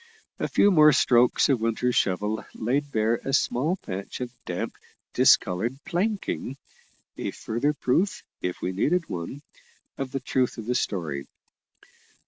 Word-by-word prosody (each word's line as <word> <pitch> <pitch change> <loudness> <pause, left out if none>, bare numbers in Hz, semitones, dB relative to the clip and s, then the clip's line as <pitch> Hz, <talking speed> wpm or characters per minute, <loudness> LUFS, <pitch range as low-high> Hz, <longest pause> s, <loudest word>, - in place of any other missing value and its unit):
A - - 0
few 205 - +4
more 155 -4 +7
strokes 125 -2 +4
of 130 -5 +2
Winter's 115 +2 0
shovel 105 +3 0
laid 140 +6 -1
bare 110 0 +2
a 135 - -3
small 145 +5 +2
patch 95 - -6
of 125 -1 -5
damp - - -4 0.4
discoloured 110 +8 +3
planking, 190 - -2 0.6
a - - -2
further 120 +7 -1
proof, 165 +8 0 0.2
if 90 0 -3
we 90 - 0
needed 160 - +1
one, 90 - -5 0.6
of 135 -1 -3
the 135 - -2
truth 130 -2 0
of 110 - -6
the 125 - 0
story. 80 - -2
125 Hz, 140 wpm, -26 LUFS, 110-145 Hz, 0.6 s, more